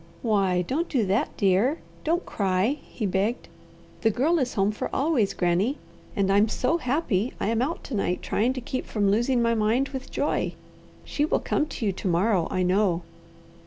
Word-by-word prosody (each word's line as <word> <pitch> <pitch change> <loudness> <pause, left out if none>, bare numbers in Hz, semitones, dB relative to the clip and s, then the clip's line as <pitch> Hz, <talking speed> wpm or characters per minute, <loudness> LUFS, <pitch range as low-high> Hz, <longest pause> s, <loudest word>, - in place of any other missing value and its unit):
"Why 195 -5 +2
don't 305 - -2
do 245 -7 +1
that, 195 +4 0
dear. 205 - +3 0.3
Don't 340 +3 0
cry," 200 +8 0
he 220 - -5
begged. 200 +5 -1 0.5
"The 225 - +4
Girl 300 +10 +2
is 255 -3 -1
home 200 0 +2
for 210 - -4
always, 270 -8 +1
Granny, 185 - +1 0.4
and 195 -1 +1
I'm 205 +2 +4
so 265 +10 0
happy 250 - 0
I - - 0
am 230 0 +1
out 305 +7 -2
to - - -8
night 190 -4 -1
trying 235 +5 +1
to 255 - -5
keep 255 +2 -4
from 205 -2 +1
losing 240 +3 +2
my 230 0 +2
mind 230 +5 +1
with 265 -1 -6
joy. - - -1 0.5
She 290 - -1
will 305 - +2
come 305 - 0
to 265 -6 -5
you 200 - +2
to 190 - -5
morrow, 180 0 +2
I 185 - 0
know." 180 -1 +2
220 Hz, 190 wpm, -26 LUFS, 195-260 Hz, 0.5 s, The